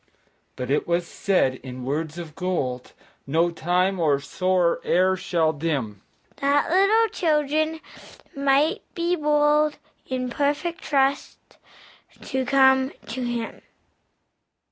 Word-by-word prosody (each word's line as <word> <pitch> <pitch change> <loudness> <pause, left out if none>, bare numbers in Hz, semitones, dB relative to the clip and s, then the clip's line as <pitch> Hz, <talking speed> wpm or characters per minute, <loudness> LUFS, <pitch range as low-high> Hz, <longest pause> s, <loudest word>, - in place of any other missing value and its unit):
But 125 +1 -4
it 145 - +1
was 170 0 0
said, 165 -8 0
in 125 -1 -8
words 155 +4 -3
of 165 -3 -7
gold 145 -9 -3 0.3
No 165 +5 +2
time 180 +3 0
or 150 -4 +2
sorrow 180 +5 0
e'er 185 +2 +2
shall 165 -4 0
dim, 140 -10 -3 0.4
That 280 +2 +1
little 405 +5 +4
children 310 -1 0 0.5
might 280 +3 +2
be 345 0 0
bold 300 -1 +2 0.3
In 255 -1 -3
perfect 295 +6 -1
trust 275 -1 0 0.8
to 265 0 -3
come 265 0 +4 0.2
to 245 +3 -4
Him. 240 -2 -4
225 Hz, 115 wpm, -24 LUFS, -, 0.8 s, little